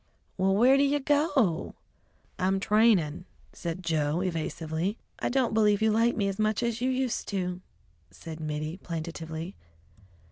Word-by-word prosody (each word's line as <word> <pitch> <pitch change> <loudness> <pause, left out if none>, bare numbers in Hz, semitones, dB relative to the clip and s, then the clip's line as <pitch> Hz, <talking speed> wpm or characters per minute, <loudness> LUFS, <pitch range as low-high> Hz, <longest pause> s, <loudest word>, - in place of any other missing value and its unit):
"Well, 190 0 +2
where 250 +6 +6
do 280 - +4
you 285 +1 +2
go?" 280 - +1 0.6
"I'm 190 +1 +1
trainin'," 195 -7 +3 0.3
said 170 +1 -5
Joe 160 0 0
evasively. 165 +2 -2 0.2
"I - - -1
don't 250 -3 +1
believe 210 -2 +4
you 220 0 +3
like 230 +2 +2
me 200 -3 +1
as 195 +1 -3
much 215 +1 +1
as 235 0 -1
you 255 - +1
used 260 -2 -1
to," 180 -2 -2 0.5
said 160 - -9
Mittie 155 +2 -4
plaintively. 165 0 -6
195 Hz, 145 wpm, -28 LUFS, 165-230 Hz, 0.6 s, where